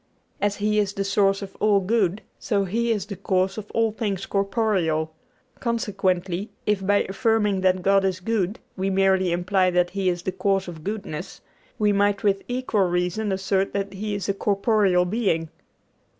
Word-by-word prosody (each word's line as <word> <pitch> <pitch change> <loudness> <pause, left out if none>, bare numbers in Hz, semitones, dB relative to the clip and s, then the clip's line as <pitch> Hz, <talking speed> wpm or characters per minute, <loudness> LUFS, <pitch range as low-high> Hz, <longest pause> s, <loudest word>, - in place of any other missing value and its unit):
As 205 0 +1
He 210 +1 +1
is 200 -2 0
the 195 - -2
source 195 0 +2
of 195 - -9
all 210 -1 +4
good, 200 -1 0 0.2
so 200 -4 0
He 230 +5 0
is 210 -4 -1
the 200 - -6
cause 190 +1 0
of 210 - -10
all 225 -1 +1
things 205 -4 -3
corporeal; 195 -6 0 0.5
consequently, 195 -5 -1 0.2
if 210 -2 +1
by 205 +1 +3
affirming 205 0 +1
that 185 -1 +2
God 195 +1 +4
is 190 -1 0
good 205 +1 -1 0.2
we 190 +1 -1
merely 190 -1 +2
imply 185 +2 +2
that 180 0 +1
He 195 -1 0
is 175 -1 -2
the 185 - -1
cause 195 0 0
of 165 -3 -8
goodness, 195 -5 -5 0.4
we 210 -2 +2
might 200 0 +1
with 195 -1 +2
equal 245 -7 0
reason 180 +4 -1
assert 195 0 0
that 200 0 -2
He 205 +2 -3
is 200 - -4
a 200 - +1
corporeal 200 -2 +2
being. 180 -5 0
195 Hz, 175 wpm, -24 LUFS, 185-210 Hz, 0.5 s, all